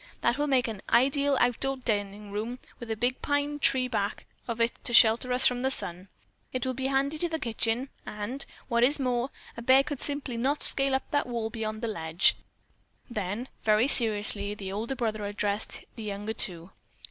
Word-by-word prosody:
That 240 - +1
will 295 - +1
make 260 -3 +2
an 215 -4 -5
ideal 275 +3 +3
outdoor 265 +3 +1
dining 205 -4 -3
room, 220 +4 -3 0.2
with 235 - -8
a 220 - -1
big 245 +3 -1
pine 285 0 -1
tree 260 -2 +3
back 205 -5 -2 0.2
of 235 -1 -3
it 230 +1 0
to 240 - +1
shelter 235 +2 +6
us 250 +1 +4
from 245 0 +3
the 265 - +1
sun. 180 -7 -2 0.4
It 255 0 -2
will 260 - -1
be 265 +1 -2
handy 275 +3 0
to 345 - +1
the 320 - -1
kitchen, 235 0 -1
and, 230 +6 -4 0.2
what 235 -2 +2
is 285 +4 +3
more, 250 -1 0 0.3
a 235 - -7
bear 260 +3 +5
simply 280 -3 -3
could - - -3
not 280 +4 +1
scale 275 -1 +4
up 265 - -4
that 290 -3 +1
wall 230 -2 -3
beyond 215 0 -4
the - - 0
ledge." 165 -4 +2 0.8
Then, 210 +3 -3 0.2
very 215 +3 +4
seriously, 210 -5 +3
the 195 -2 -6
older 225 +7 -3
brother 215 -4 -2
addressed 205 0 -2
the 230 - -8
younger 210 +1 -4
two. 175 -4 -3
235 Hz, 195 wpm, -28 LUFS, 210-265 Hz, 0.8 s, shelter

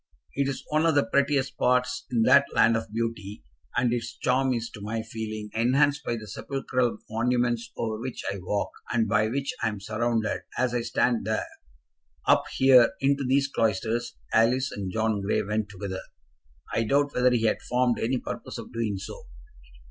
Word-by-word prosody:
It 140 0 0
is 140 - -4
one 155 +2 +2
of 160 - +2
the 145 - +4
prettiest 140 +2 +2
spots 125 0 0
in 115 -2 +2
that 140 +4 +6
land 115 +1 +5
of 115 -1 -3
beauty; 110 -2 -4 0.3
and 120 -1 +2
its 115 -1 -4
charm 130 +1 +1
is 115 -2 -1
to 105 - -10
my 110 +2 -3
feeling 110 -2 -6
enhanced 140 +5 +2
by 120 - -1
the 110 -2 -7
sepulchral 125 +2 -2
monuments 120 +1 0
over 110 -1 -2
which 130 0 -5
I 100 - -6
walk, 100 +3 -2 0.2
and 115 -2 +2
by 110 0 +2
which 135 +4 -2
I - - +2
am 105 -2 -3
surrounded, 110 +1 -1 0.2
as 125 -1 +1
I 120 - +1
stand 115 -1 +1
there. 110 0 0 0.8
Up - - +5
here, 130 -3 +6
into 140 0 +2
these 135 +2 +2
cloisters, 115 0 -1 0.2
Alice 125 +4 +3
and 95 -2 -4
John 110 0 0
Grey 100 +2 0
went 105 +1 -2
together. 95 -1 -5 0.7
I 115 - +2
doubt 140 +5 +2
whether 125 0 +4
he 120 -2 +1
had 110 - +1
formed 125 -1 +1
any 125 +3 0
purpose - - -6
of - - -9
doing 110 -4 -1
so. 95 - -8
115 Hz, 180 wpm, -26 LUFS, 110-130 Hz, 0.8 s, that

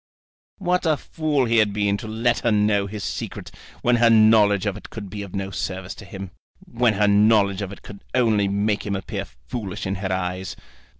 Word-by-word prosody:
What 180 -2 0
a 155 -2 +3
fool 150 -5 -1
he 115 0 +2
had 105 -2 +3
been 100 -1 +1
to 110 - -8
let 115 +2 +1
her 115 - +1
know 105 -1 +2
his 105 0 -6
secret - - -5 0.3
when 120 0 +4
her 120 0 +5
knowledge 110 -3 +5
of 100 -2 -1
it - - -10
could 100 -4 -8
be 105 0 -5
of 100 -1 -8
no 100 0 -3
service 95 0 -4
to 105 - -12
him, 95 -2 -8 0.3
when 120 -2 +1
her 105 +1 +3
knowledge 100 -1 +4
of 100 -1 -4
it 100 - -11
could 100 -1 -11
only 110 -5 +3
make 100 +1 0
him 100 -1 -2
appear 95 - -4
foolish 95 - -7
in 95 - -1
her 95 -2 -2
eyes! 90 -1 -3
105 Hz, 205 wpm, -23 LUFS, 100-115 Hz, 0.3 s, her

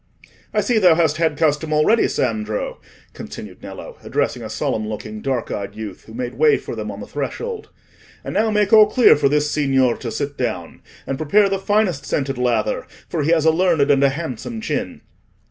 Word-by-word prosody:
"I - - +1
see 240 -4 +2
thou 180 -5 +6
hast 160 -2 +2
had 160 -3 +1
custom 155 0 +1
already, 155 +10 +3
Sandro," 110 -3 -2 0.3
continued - - -9
Nello, - - -9
addressing - - -1
a - - -6
solemn 110 -1 -2
looking 110 0 -6
dark 130 -4 -2
eyed 100 0 -5
youth, 105 -4 -8
who 110 - -12
made 125 0 -5
way 450 -3 +5
for - - -7
them - - -5
on - - -7
the - - -6
threshold. 465 -2 -5 0.5
"And - - -5
now 220 +1 +2
make 210 -1 +1
all 215 -1 +9
clear 245 +3 +6
for 145 -1 +2
this 150 +1 +1
signor 135 -4 +2
to 120 - -5
sit 140 +4 -4
down. 90 -9 -3 0.2
And 135 - -4
prepare 195 +7 +3
the 195 0 -1
finest 195 -8 0
scented 135 -2 -2
lather, 120 -3 0 0.2
for 165 - -1
he 145 - 0
has 165 -2 +3
a 160 - +6
learned 160 -4 +2
and 140 -1 +3
a 140 - +5
handsome 160 - -5
chin." 220 - -3
150 Hz, 195 wpm, -20 LUFS, 125-185 Hz, 0.5 s, all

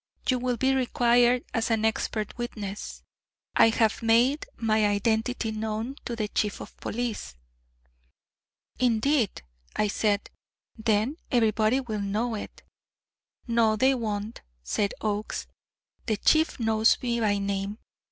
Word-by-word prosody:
You 255 -2 +2
will 250 -1 -1
be 265 +3 +2
required 245 -1 +3
as 230 0 0
an 220 -1 +1
expert 220 -1 -1
witness. 210 -4 -6 0.5
I - - +7
have 225 0 +1
made 235 +6 +3
my 215 -2 +2
identity 220 +3 0
known 220 +4 -3
to 235 - -3
the 215 -2 -2
Chief 210 -1 -1
of - - -10
Police." 230 - -4 1.4
"Indeed," 240 - +1 0.3
I 210 - +1
said; 205 0 0 0.4
"then 220 +5 0
everybody 220 0 +3
will 220 -5 -4
know 215 +4 -1
it." 215 - -7 0.8
"No, 230 -2 +3
they 260 +5 +4
won't," 220 -2 -3 0.2
said 195 - -1
Oakes. 210 0 -2 0.6
"The 215 -3 +1
Chief 315 +8 +3
knows 220 -1 +3
me 235 -1 0
by 210 -3 +2
name. 200 +1 -2
225 Hz, 125 wpm, -27 LUFS, 215-240 Hz, 1.4 s, I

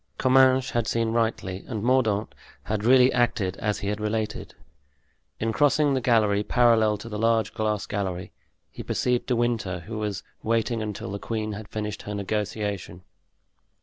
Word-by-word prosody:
Comminges 130 0 +4
had 120 -2 0
seen 115 0 0
rightly, 110 -5 -1
and 110 -4 -4
Mordaunt 115 -4 +1 0.3
had 105 -1 -2
really 125 +2 +6
acted 115 -6 +1
as 105 -1 -1
he 100 - -2
had 105 +1 -3
related. 105 0 -3 0.8
In 110 0 -1
crossing 145 +1 +3
the 130 - 0
gallery 110 -4 +3
parallel 110 -2 +3
to 110 - -10
the 105 -2 -5
large 115 -1 +2
glass 105 -1 -1
gallery, 95 -3 -3 0.4
he - - -8
perceived 125 -1 -1
De 125 - +1
Winter, 115 -6 -1
who 110 +6 -6
was 105 -3 -3 0.2
waiting 115 0 0
until 105 -2 -5
the 100 - -4
queen 110 -1 -3
had 105 +1 -7
finished 105 -1 -4
her 105 - -6
negotiation. 100 -3 -3
110 Hz, 160 wpm, -25 LUFS, 105-120 Hz, 0.8 s, really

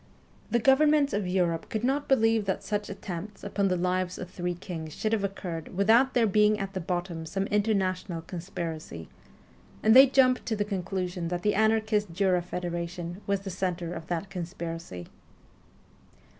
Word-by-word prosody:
The 235 - +2
governments 285 +3 +4
of 205 -2 -1
Europe 175 -3 0
could 220 0 -3
not 275 +3 0
believe 225 -4 +3
that 190 - -2
such 210 -1 -2
attempts 195 +1 -7
upon 200 -1 0
the 180 -1 +1
lives 180 0 -1
of 180 -1 -7
three 175 0 -3
kings 165 -3 -7
should 215 0 -1
have 215 -3 +1
occurred 180 -5 -5
without 230 +7 +4
there 240 -2 +4
being 210 +1 +4
at 195 -1 -4
the 190 - -2
bottom 175 -1 -3
some 190 +5 -2
international 190 -5 0
conspiracy, 165 - -6 0.7
and 220 +2 +6
they 265 +1 +10
jumped 255 -1 +3
to 225 - 0
the 205 -1 -1
conclusion 185 -3 -3
that 175 +1 -3
the 210 - +2
anarchist 215 -2 +2
Jura 185 -1 +2
Federation 175 +1 -5
was 200 -1 0
the 195 -1 -6
centre 175 -2 -2
of 165 - -7
that 175 +3 -3
conspiracy. 165 - -6
190 Hz, 165 wpm, -28 LUFS, 175-210 Hz, 0.7 s, they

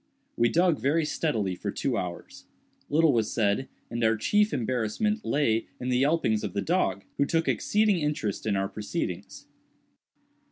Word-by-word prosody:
We 120 0 +3
dug 170 0 +3
very 150 +7 +1
steadily 135 - -1
for 90 - -5
two - - -1
hours. 90 -1 -6 0.4
Little 155 0 +4
was 115 -3 +1
said; 105 +4 0 0.2
and 120 0 -2
our 110 0 +3
chief 210 - +2
embarrassment 130 - -1
lay 115 -6 +1
in 125 - -3
the 125 0 +2
yelpings 140 -8 +2
of - - -4
the 100 - -1
dog, 170 - 0
who 140 - +3
took 165 +1 0
exceeding 210 -3 +2
interest 150 -10 -2
in 105 - +1
our 95 0 0
proceedings. 105 +1 -5
130 Hz, 160 wpm, -27 LUFS, 110-165 Hz, 0.4 s, Little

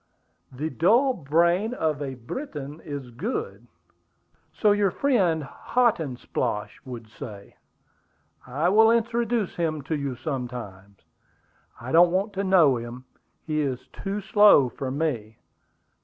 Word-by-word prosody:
"The 150 +5 -4
dull 235 - +3
brain 170 - +1
of 155 - -1
a 135 -2 -4
Briton 145 - -7
is 140 -4 -7
good." 235 - -4 0.8
"So 210 - +2
your 205 -1 +3
friend 185 - +1
Hotandsplosh 140 - -1
would 120 -3 -8
say." 105 -2 -10 0.9
"I 145 +7 0
will 220 +3 +6
introduce 230 -2 0
him 155 -4 -1
to 155 +4 -2
you 140 -3 -3
some 130 0 -3
time." 100 -5 -9 0.8
"I 120 +3 -7
don't 175 +2 +6
want 195 +4 -1
to 195 0 -2
know 170 -9 +5
him; 120 +2 -8 0.4
he 155 -1 0
is 130 -3 -3
too 200 +1 -4
slow 205 - +6
for 130 +2 -5
me." 130 -7 -2
155 Hz, 125 wpm, -25 LUFS, 130-200 Hz, 0.9 s, will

